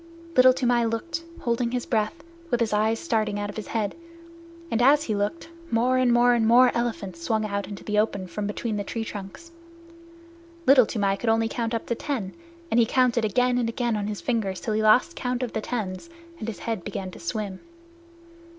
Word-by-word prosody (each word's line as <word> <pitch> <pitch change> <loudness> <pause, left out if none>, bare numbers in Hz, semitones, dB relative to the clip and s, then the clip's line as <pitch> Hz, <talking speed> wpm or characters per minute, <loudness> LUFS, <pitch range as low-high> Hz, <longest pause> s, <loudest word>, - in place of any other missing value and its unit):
Little 255 0 +8
Toomai 245 -2 +2
looked, 280 +9 -3 0.2
holding 235 0 0
his 245 0 -2
breath, 230 +8 -1 0.3
with 240 - +1
his 225 -2 0
eyes 215 +2 +2
starting 215 -9 -1
out 205 0 -3
of - - -16
his 215 - -6
head, 215 -3 -1 0.8
and 230 - +1
as 285 +4 +5
he 220 - -2
looked, 205 +12 -2 0.2
more 250 +3 +2
and 255 -1 +3
more 240 +1 +5
and 230 -2 +2
more 245 +2 +6
elephants 210 -7 -3
swung 215 +5 0
out 200 -2 -3
into 200 - -8
the 210 0 0
open 200 -3 0
from 200 +4 -4
between 210 +1 -3
the 205 - -2
tree 225 +2 -4
trunks. 210 - -8 1.1
Little 260 -3 +7
Toomai 200 -3 0
could 225 - -1
only 225 0 +3
count 230 0 -2
up 225 - -3
to - - -1
ten, 230 -7 -3 0.4
and 230 - +4
he 235 - +5
counted 250 -2 +2
again 250 +4 +2
and 235 -2 0
again 235 -1 -1
on 205 -1 -2
his 210 -1 -4
fingers 215 -6 -1
till 220 - -3
he 215 - +1
lost 245 +10 +4
count 250 0 -2
of 240 - -4
the 220 - -2
tens, 215 - -4 0.3
and 215 - -5
his 220 -5 -4
head 225 -6 -2
began 185 +1 -5
to - - -12
swim. 190 +2 -4
225 Hz, 205 wpm, -25 LUFS, 210-245 Hz, 1.1 s, Little